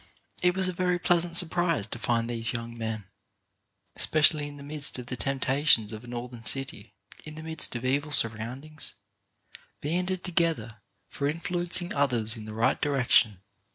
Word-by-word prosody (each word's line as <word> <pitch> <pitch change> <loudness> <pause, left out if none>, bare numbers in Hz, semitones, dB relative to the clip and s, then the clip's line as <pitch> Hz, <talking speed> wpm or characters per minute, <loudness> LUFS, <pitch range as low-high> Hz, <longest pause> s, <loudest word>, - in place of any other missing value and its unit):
It 180 0 +3
was 190 -1 +1
a 185 - -2
very 180 0 +1
pleasant 175 -1 +1
surprise 175 - +1
to - - -7
find 115 -1 0
these 115 -1 0
young 115 0 -5
men, 110 -2 -4 0.9
especially 155 -1 +4
in 145 0 -10
the 140 - -10
midst 145 -1 -4
of 125 - -7
the 125 - -4
tempta 135 +2 0
tions 110 -5 +4
of 110 +1 -8
a - - -12
Northern 120 0 -6
city, 115 -5 -1 0.3
in 155 0 -9
the 155 - -8
midst 160 -5 0
of 120 +1 -4
evil 145 +3 0
sur 135 -5 +7
roundings, 130 +8 -6 0.8
banded 180 +4 -2
together 165 - 0 0.3
for 140 - -2
influencing 175 +3 -1
others 120 -6 +2
in 110 -2 -8
the 110 - -7
right 115 +4 +1
direction. 125 -8 +3
140 Hz, 170 wpm, -28 LUFS, 115-165 Hz, 0.9 s, sur